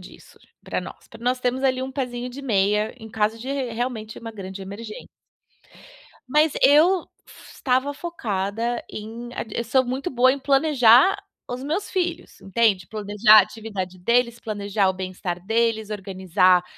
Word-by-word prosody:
disso - - -15 0.2
pra - - -3
nós - - -11
pra - - -14
nós 250 +1 +1
termos 255 +2 -1
ali 260 -1 +2
um 265 0 -5
pézinho 250 -2 -3
de 270 +3 -9
meia 210 -3 +1
em 220 - -10
caso 220 0 0
de 250 +4 -8
r 265 -4 -2
realmente 225 -2 -4
uma 230 -1 -7
grande 195 -2 -8
emergên 210 +3 -8 1.2
mas 300 +3 +3
eu 330 +6 +5 0.2
f - - -15
estava 260 +2 0
focada 230 - -3
em 225 +3 -7 0.3
eu 235 - -1
sou 260 +3 +2
muito 260 +7 -3
boa 255 0 +4
em 280 - -4
planejar 275 - +5 0.3
os 250 +1 -5
meus 320 +9 -2
filhos, 350 -2 -3
entende, 195 -3 +1
planejar 210 0 +4
a 205 - +8
atividade 205 -3 -6
deles, 235 +3 +1
planejar 205 -2 -1
o 190 - +2
bem-estar 185 -1 -5
deles, 225 -1 +1
organizar, 185 -3 +2
230 Hz, 155 wpm, -23 LUFS, 205-260 Hz, 1.2 s, a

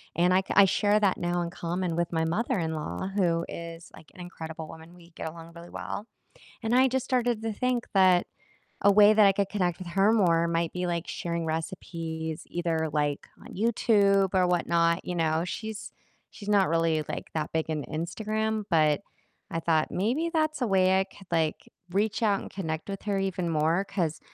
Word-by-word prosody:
and 175 +2 +3
I 185 - +4
ca 190 - -5
I 200 - +9
share 205 +2 +2
that 195 -3 +2
now 175 0 -1
in 170 - -2
common 170 0 -3
with 170 0 -1
my 160 0 +1
mother-in-law, 170 - -2
who 170 -4 +2
is, 170 0 -8
like, 155 - -15
an 180 - -10
incredible 160 -3 -8
woman, 165 +1 -12
we 170 -1 -17
get 165 - -7
along 165 +1 -9
really 170 +1 -11
well, 210 - -6 0.6
and 225 +1 0
I 260 +1 +6
just 260 0 -1
started 245 -3 +1
to 225 0 -2
think 250 +1 -1
that 185 -2 +5 0.6
a 205 - +8
way 205 +1 +7
that 215 -1 +6
I 195 - +7
could 195 0 0
connect 180 -5 0
with 185 - -7
her 195 +4 +3
more 170 -6 +3
might 170 -1 -1
be, 180 0 -2
like, 170 -1 -2
sharing 170 -1 -3
recipes 160 -1 -4
either, 165 -2 -1
like, 145 -1 -1
on - - -12
YouTube 200 -3 +3
or 185 -1 +4
whatnot, 170 -1 +1
you 180 - -3
know? 160 -1 +1
She's 215 +3 -6 0.4
she's 205 -1 -8
not 200 -2 +4
really, 165 -1 +1
like, - - -5
that 155 -1 -2
big 160 0 -1
into 155 -2 -3
Instagram, 215 +7 -2
but 155 -1 +3 0.5
I 165 - -1
thought 160 -2 +1
maybe 250 - 0
that's 310 -2 0
a - - +1
way 190 -1 +4
I - - +2
could, 195 0 -17
like, 160 -2 -1 0.2
reach 210 +4 0
out 205 -3 +2
and - - -8
connect 160 -3 -4
with 195 -1 -5
her 200 -2 0
even 185 -2 -1
more, 165 +4 +1
'cause 175 -6 -2
175 Hz, 195 wpm, -27 LUFS, 165-205 Hz, 0.6 s, I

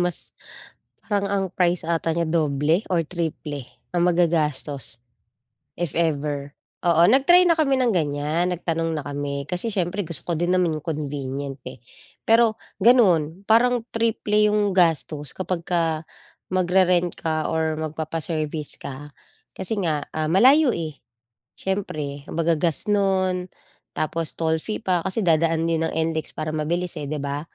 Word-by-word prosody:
mas 175 -1 -2 0.8
parang 200 -2 0
ang 195 -1 +1
price 175 -2 +1
ata 165 -1 0
niya 170 0 0
doble 155 +2 +1
or 165 -3 +1
triple 155 -5 -4 0.3
ang 175 - +3
magagastos, 150 -8 0 0.8
if 175 -4 -2
ever. 145 -3 -1 0.2
Oo, 170 -1 +4
nag-try 280 - +6
na 340 - +5
kami 285 -5 +2
ng 245 -4 +2
ganyan, 155 +2 0
nagtanong 165 -2 -2
na 145 - -4
kami. 140 -1 -4
Kasi 180 +6 -3
siyempre, 195 -1 -1
gusto 165 -5 -2
ko 170 - -1
din 175 +2 -1
naman 180 -3 +2
'yung 155 - -4
convenient, 140 -3 -4
eh. 130 - -11 0.5
Pero 225 -1 +4 0.2
gano'n, 190 -7 +4
parang 235 +2 +3
triple 210 -2 +2
'yung 205 -2 +1
gastos 160 -4 +1
kapagka 170 -3 -1 0.5
magre-rent 180 -1 +2
ka 155 -1 -2
or 160 -1 0
magpapa-service 155 -1 -4
ka. 145 +2 -8 0.4
Kasi 195 +3 -3
nga, 150 -3 -1
ah, 155 0 -2
malayo, 260 - +5
eh. 155 -4 -4 0.6
Siyempre, 150 -8 -4
kumbaga 165 0 +1
gas 165 -2 0
no'n, 185 -3 +1 0.5
tapos 160 0 -2
toll 160 -1 +1
fee 215 - -4
pa, 185 -5 +1
kasi 190 +4 -1
dadaan 165 0 +2
'yun 165 -1 +1
ng - - -7 0.2
NLEX 160 -1 -4
para 155 - -2
mabilis, 170 +3 -1
eh, 145 - -4
di 155 - -2
ba? 140 +1 -3
165 Hz, 145 wpm, -23 LUFS, 155-185 Hz, 0.8 s, nag-try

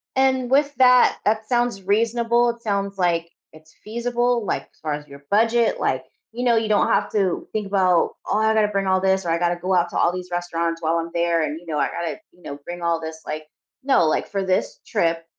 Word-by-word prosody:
And, 260 -2 +2
with 285 +1 +3
that, 250 -1 +5
that 215 +1 +1
sounds 240 -5 0
reasonable, 230 +4 +2
it 235 0 -5
sounds 200 -2 -2
like 170 -2 0 0.2
it's 155 0 -18
feasible. 240 +1 -1
Like, - - -2
as - - -30
far 155 -1 -2
as 150 0 -6
your 140 0 -14
budget, 230 +2 +2
like, 130 0 0 0.3
you 245 +2 -4
know 240 -2 +3
you 225 -1 0
don't 210 - +3
have - - +1
to 195 -4 0
think 215 -2 -2
about, 185 -3 +2
"Oh, - - +1
I 220 0 +3
gotta 215 -1 +3
bring 200 -1 -1
all 190 0 +3
this 190 -1 +1
or - - -2
I 165 - +1
gotta 175 0 +1
go 180 +2 -2
out 175 -1 +2
to - - -4
all 170 - +3
these 180 0 -6
restaurants 170 -1 -2
while 165 +1 +1
I'm 165 0 -4
there. 170 -1 +1
And, 155 +2 -3
you 175 - -18
know, 155 -3 -2
I - - +2
gotta, 170 - -4
you 180 - -25
know, 140 - -7
bring 175 0 -7
all 170 -1 0
this 160 0 -7
like" 155 0 -5 0.4
no, 265 -10 +3
like, - - 0
for 195 -1 -2
this 185 0 -1
trip 165 0 0
190 Hz, 235 wpm, -22 LUFS, 170-230 Hz, 0.4 s, that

